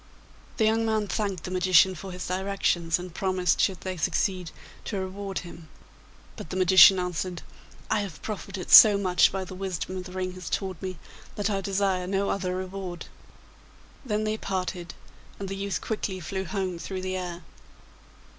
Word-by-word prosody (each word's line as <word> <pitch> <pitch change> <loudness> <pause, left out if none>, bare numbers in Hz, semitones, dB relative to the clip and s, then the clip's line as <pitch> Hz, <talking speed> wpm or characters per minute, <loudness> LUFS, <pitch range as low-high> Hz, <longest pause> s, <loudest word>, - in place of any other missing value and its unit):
The 220 - +3
young 225 +1 +2
man 220 -1 0
thanked 195 -3 -2
the 185 - -5
magician 185 0 +4
for 185 +2 -8
his 180 0 -6
directions, 185 -3 0
and 180 -1 -8
promised, 185 -2 +1
should 190 -3 +1
they 185 -1 -4
succeed, 180 +1 0 0.4
to 205 - -3
reward 195 +1 -5
him. 165 -2 -11 0.7
But - - -8
the - - -5
magician 185 0 +8
answered, 180 -1 -3 0.5
'I - - +3
have 195 -7 -6
profited 195 -3 -6
so 210 -2 +10
much 185 -2 +3
by 195 0 -3
the 185 - -9
wisdom 185 -1 -4
the 180 0 -10
ring 185 0 -3
has 180 -2 -8
taught 190 -4 -3
me 185 -2 -5 0.4
that 205 0 -1
I 195 -1 -1
desire 190 -2 0
no 195 +1 0
other 185 -2 -2
reward.' 185 -1 -5 1.0
Then 215 -4 -1
they 215 0 -1
parted, 185 -3 -4 0.4
and 200 - -5
the 195 - -4
youth 200 0 -3
quickly 205 -3 -3
flew 190 +3 -4
home 185 -2 -3
through 190 +2 -5
the 185 0 -2
air. 180 -1 -5
185 Hz, 170 wpm, -27 LUFS, 180-195 Hz, 1.0 s, so